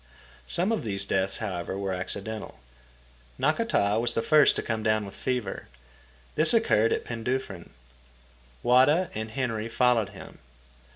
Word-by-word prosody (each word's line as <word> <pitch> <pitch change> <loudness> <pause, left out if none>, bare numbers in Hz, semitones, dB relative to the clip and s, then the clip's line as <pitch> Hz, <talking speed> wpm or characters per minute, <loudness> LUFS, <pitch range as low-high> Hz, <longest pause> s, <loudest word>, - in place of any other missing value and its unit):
Some 185 +6 +2
of 220 -10 -1
these 100 -3 -2
deaths, 95 0 0
however, 95 -3 -4
were 100 -1 -2
accidental. 100 0 -5 0.8
Nakata 100 +2 +1
was 120 0 +1
the 115 - 0
first 150 -2 +5
to - - -2
come 110 -1 -2
down 110 -1 +1
with 100 - -10
fever. 125 -6 -3 0.7
This 155 +9 +5
occurred 115 - +3
at - - -1
Penduffryn. 115 -5 -4 0.9
Wada 145 +8 +4
and 110 +1 -4
Henry 115 -2 -3
followed 120 -3 +2
him. - - -12
110 Hz, 135 wpm, -27 LUFS, 100-125 Hz, 0.9 s, first